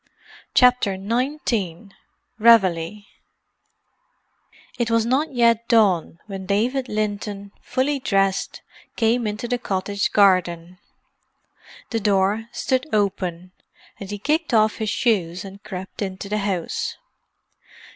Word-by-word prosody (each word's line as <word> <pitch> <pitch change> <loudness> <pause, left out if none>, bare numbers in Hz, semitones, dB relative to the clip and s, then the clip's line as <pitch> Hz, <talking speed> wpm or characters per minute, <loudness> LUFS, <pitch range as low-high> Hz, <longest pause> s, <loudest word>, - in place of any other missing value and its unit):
CHAPTER 250 -6 +4
XIX 220 - -2 0.5
REVEILLE 205 -4 +4 1.8
It 235 -1 0
was 230 -1 +2
not 270 +6 +1
yet 235 -2 +2
dawn 195 -8 +3
when 195 -2 -7
David 250 +6 0
Linton, 205 -1 -3
fully 275 +2 -1
dressed, 195 -5 0 0.3
came 230 0 +1
into 210 +3 -4
the 245 0 -1
cottage 200 -2 -2
garden. 180 -3 +2 1.1
The 225 - 0
door 205 +2 +1
stood 260 +2 -1
open, 185 -4 -1 0.5
and 195 - -8
he 205 - -4
kicked 300 +4 0
off 215 0 +3
his 220 -1 -2
shoes 185 -7 0
and 195 +1 -11
crept 190 +1 -8
into 195 0 -4
the 210 +1 0
house. 195 -4 -2
210 Hz, 110 wpm, -22 LUFS, 190-235 Hz, 1.8 s, CHAPTER